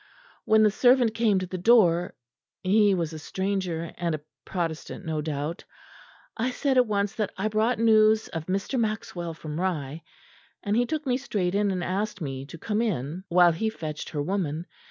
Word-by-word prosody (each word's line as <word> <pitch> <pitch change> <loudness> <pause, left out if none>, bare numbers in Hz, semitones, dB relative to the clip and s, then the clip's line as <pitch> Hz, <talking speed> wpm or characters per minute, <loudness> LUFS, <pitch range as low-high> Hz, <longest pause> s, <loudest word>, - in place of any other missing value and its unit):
When 220 0 +5
the 210 - +5
servant 245 0 +4
came 225 -3 +2
to 185 - -1
the 185 0 -5
door 180 -5 +4 0.5
he 200 +1 +4
was 165 -3 -2
a 155 - -6
stranger, 185 -2 -3
and 170 -2 0
a 150 - -8 0.2
Protestant 170 +1 -4
no 160 -1 -2
doubt 150 +2 -4 0.7
I 235 +3 0
said 265 +2 0
at 250 -2 +5
once 205 0 0
that 210 -3 -2
I 205 +3 0
brought 220 +3 +1
news 220 -1 +4
of 165 -1 -5
Mr. 195 +7 -1
Maxwell 190 -7 -3
from 155 +1 -5
Rye; 160 -5 -2 0.6
and 205 -1 0
he 245 +1 +2
took 305 +3 -3
me 250 -2 +1
straight 200 -9 -2
in 205 0 +2
and 185 -2 -2
asked 195 +3 -2
me 135 -4 -5
to 165 - -9
come 210 +6 -1
in 180 - -2
while 175 0 +6
he 220 +7 -1
fetched 155 -7 -6
her 145 -2 -2
woman. 170 -3 -2
190 Hz, 185 wpm, -26 LUFS, 165-220 Hz, 0.7 s, while